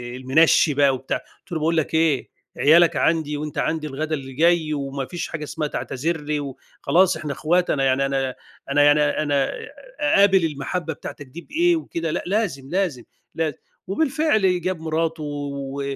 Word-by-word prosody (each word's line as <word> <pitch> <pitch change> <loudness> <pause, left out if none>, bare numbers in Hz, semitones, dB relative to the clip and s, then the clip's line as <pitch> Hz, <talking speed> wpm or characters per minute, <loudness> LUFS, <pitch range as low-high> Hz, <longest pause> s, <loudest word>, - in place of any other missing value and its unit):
المنشّي 145 +4 +4
بقى 140 -1 +4
وبتاع. 130 +1 -3
قُلت - - -23
له: 165 - -1
"باقول 165 +2 +1
لَك 160 - 0
إيه، 160 -4 +2 0.3
عيالَك 165 +3 +5
عندي 155 -3 +1
وأنت 150 0 -6
عندي 155 -1 -1
الغدا 155 +3 -2
اللي 135 -2 -8
جاي، 160 +1 +2
وما 140 -1 -3
فيش 175 +3 -5
حاجة 155 -1 -5
اسمها 150 0 -3
تعتذر 155 +3 -3
لي 150 0 -2
وخلاص 160 +6 0
إحنا 150 -2 -4
أخوات، 175 +5 +1
أنا 135 - +1
يعني 135 +1 +2
أنا 135 -2 -1 0.4
أنا 145 +1 +4
يعني 145 +1 +5
أنا 145 -2 +1 0.5
أقابل 200 - +4
المحبّة 160 +2 -3
بتاعتَك 145 - -9
دي 160 +7 -10
بإيه، 340 - +2
وكده 165 - -3
لأ، - - -2
لازم، 180 -9 -1
لازم، 175 -10 -1 0.3
لازم." 160 -4 -1 0.3
وبالفعل 220 - +1
جاب 185 -1 -2
مراته 160 0 -2
و 140 -1 -5
155 Hz, 165 wpm, -22 LUFS, 140-170 Hz, 0.5 s, عيالَك